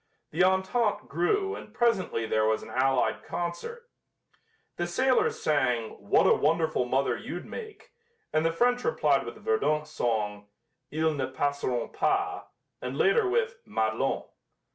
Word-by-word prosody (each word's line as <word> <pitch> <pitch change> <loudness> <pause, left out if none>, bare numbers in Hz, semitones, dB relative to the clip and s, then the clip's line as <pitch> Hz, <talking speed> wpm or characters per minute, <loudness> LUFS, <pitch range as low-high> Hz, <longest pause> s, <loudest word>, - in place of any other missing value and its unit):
The 165 +4 +2
entente 190 +4 +1
grew 390 - 0
and 215 - -11
presently 215 - +1
there 110 0 +1
was 110 0 +1
an - - -10
allied 130 0 +1
concert. 175 - -5 0.9
The 175 - -1
sailors 255 +9 +2
sang, 125 -7 +1
"What 100 - +3
a - - +6
Wonderful 160 -3 +1
Mother 130 +2 +1
You'd - - -6
Make," 435 -2 -9 0.4
and 155 - +2
the 165 - +2
French 245 +8 +2
replied 475 - +2
with - - -6
the - - -15
Verdun 425 - +1
song, 105 -8 -2 0.4
"Ils 155 0 0
Ne 135 -2 -1
Passeront 135 -2 -1
Pas," 390 0 0 0.4
and - - -4
later 430 -2 +3
with 470 +3 0
"Madelon." - - 0
170 Hz, 140 wpm, -28 LUFS, -, 0.9 s, a